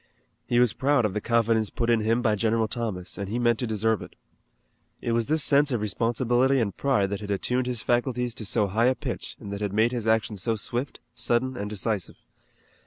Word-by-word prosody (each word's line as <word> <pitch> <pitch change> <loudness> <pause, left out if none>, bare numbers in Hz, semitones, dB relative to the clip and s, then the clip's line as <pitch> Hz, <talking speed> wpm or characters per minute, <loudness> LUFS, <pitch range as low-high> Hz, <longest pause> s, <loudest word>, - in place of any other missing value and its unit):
He 120 - +2
was 125 -3 +4
proud 140 -3 +2
of 105 - -1
the 105 - -2
confidence 115 -2 +2
put 115 - -2
in 115 - +4
him 115 +3 +1
by 110 -3 +3
General 110 +1 +1
Thomas, 105 -7 -4
and 100 -1 -4
he 115 - -2
meant 120 -2 +2
to 125 - -1
deserve 110 0 0
it. - - -11 0.8
It 120 - -2
was 115 -1 +1
this 155 0 +2
sense 145 0 +4
of 120 - 0
responsibility 120 +5 +1
and 105 -5 -1
pride 105 -9 +1
that 100 - -3
had 105 - -7
attuned 125 +5 -1
his 120 -4 -3
faculties 120 0 0
to 110 - -7
so 105 0 +2
high 110 +5 +2
a 130 - +3
pitch - - -6
and 100 - -7
that 100 - -5
had 100 -2 -2
made 110 +3 +3
his 120 -3 -3
action 110 -1 +1
so 110 +5 0
swift, 120 +5 -4
sudden 120 +2 0
and 105 -3 -4
decisive. 105 -2 -2
115 Hz, 220 wpm, -26 LUFS, 105-125 Hz, 0.8 s, was